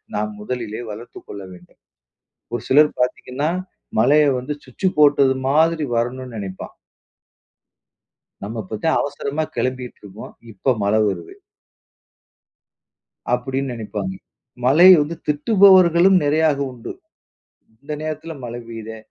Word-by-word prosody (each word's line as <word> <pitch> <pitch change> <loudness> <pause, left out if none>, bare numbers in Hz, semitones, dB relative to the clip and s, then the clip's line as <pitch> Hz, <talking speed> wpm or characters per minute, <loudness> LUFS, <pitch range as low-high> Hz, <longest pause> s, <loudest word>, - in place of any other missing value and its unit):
நாம் 105 +1 -2
முதலிலே 115 0 -5
வளர்த்துக் 115 +3 -11
கொள்ள 100 - -8
வேண்டும். 90 0 -18 0.7
ஒரு 120 -2 -3
சிலர் 150 +2 +5
பார்த்தீங்கன்னா, 125 +4 -1 0.5
மழையை 145 +5 +4
வந்து 130 +4 -4
சுவிட்சு 130 +9 -2
போட்டது 140 -2 +5
மாதிரி 160 +2 +2
வரணும்னு 125 +1 -3
நினைப்பான். 95 -2 -7 1.7
"நம்ம 110 +3 -5
இப்பத்தேன் 110 +12 -1
அவசரமா 145 +2 -3
கெளம்பிட்டுருப்போம். 125 -5 -5 0.2
இப்ப 125 +6 0
மழை 105 +2 +2
வருது." 85 -4 -5 2.0
அப்படின்னு 130 +1 -3
நெனைப்பாங்க. 105 -4 -5 0.5
மழைய 170 +9 +8
வந்து 160 +3 -5
திட்டுபவர்களும் 185 +2 +5
நிறைய 150 0 +2
உண்டு. 120 -2 -8 0.9
"இந்த 150 +2 -6
நேரத்தில 155 +1 -5
மழை 120 0 -6
பெய்யுதே! 110 -1 -8
130 Hz, 105 wpm, -20 LUFS, 110-150 Hz, 2.0 s, மழைய